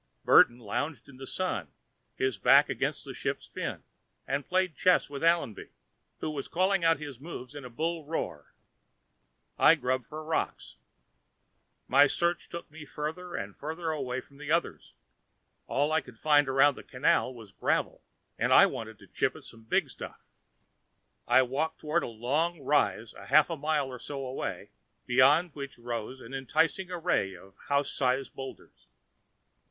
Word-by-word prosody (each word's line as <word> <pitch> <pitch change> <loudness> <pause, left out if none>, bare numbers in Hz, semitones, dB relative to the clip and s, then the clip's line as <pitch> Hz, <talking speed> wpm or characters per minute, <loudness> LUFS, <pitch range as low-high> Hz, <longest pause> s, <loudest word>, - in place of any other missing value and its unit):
Burton 120 - +7
lounged 125 +8 -4
in 140 -2 -14
the 135 0 -8
Sun, 185 - -2 0.5
his 130 -6 -1
back - - +6
against - - -2
a - - -7
ship's - - -3
fin, - - -5 0.4
and 135 +1 -2
played 185 -2 +1
chess 180 -5 +3
with 140 +1 -5
Allenby, 165 - +1 0.5
who 155 - -2
was 140 -2 -4
calling 185 +1 +1
out 165 0 +4
his 145 -5 -8
moves 135 -4 -8
in 145 -2 -8
a 125 - -8
bull 160 +6 -2
roar. 80 - -4 1.1
I - - +7
grubbed 130 -1 -1
for 155 +1 -7
rocks. 160 - -3 1.1
My 140 +2 +6
search 170 +4 0
took 170 -3 -8
me 155 0 -10
farther 155 +5 -5
and 100 +1 -5
farther 160 +2 -4
away 130 -4 -3
from 140 +2 -20
the 150 0 -8
others 170 +1 -1 0.7
all 145 +3 +1
I 160 0 +3
could 125 -5 -15
find 145 +1 +4
around 135 +2 +5
the - - -11
'canal' 130 0 +1
was 110 -4 -12
gravel, - - -1 0.4
and - - +1
I - - +9
wanted - - -5
to - - -17
chip - - 0
at - - -12
some 115 -1 -13
big - - +1
stuff. - - -9 1.1
I 130 - +6
walked 145 +6 -2
toward 155 +3 0
a - - -4
long 145 +9 -1
rise 130 -5 +1
a - - -12
half 150 +4 +5
mile 155 -2 0
or 125 -1 -8
so 135 +1 -5
away, 130 +1 -5 0.3
beyond 140 +8 +4
which 140 -2 -7
rose 120 +2 -5
an 115 - -11
enticing 160 +7 0
array 170 - 0
of 95 +2 -16
house 140 0 +1
sized 130 0 0
boulders. 135 -1 -10
145 Hz, 165 wpm, -29 LUFS, 125-160 Hz, 1.1 s, I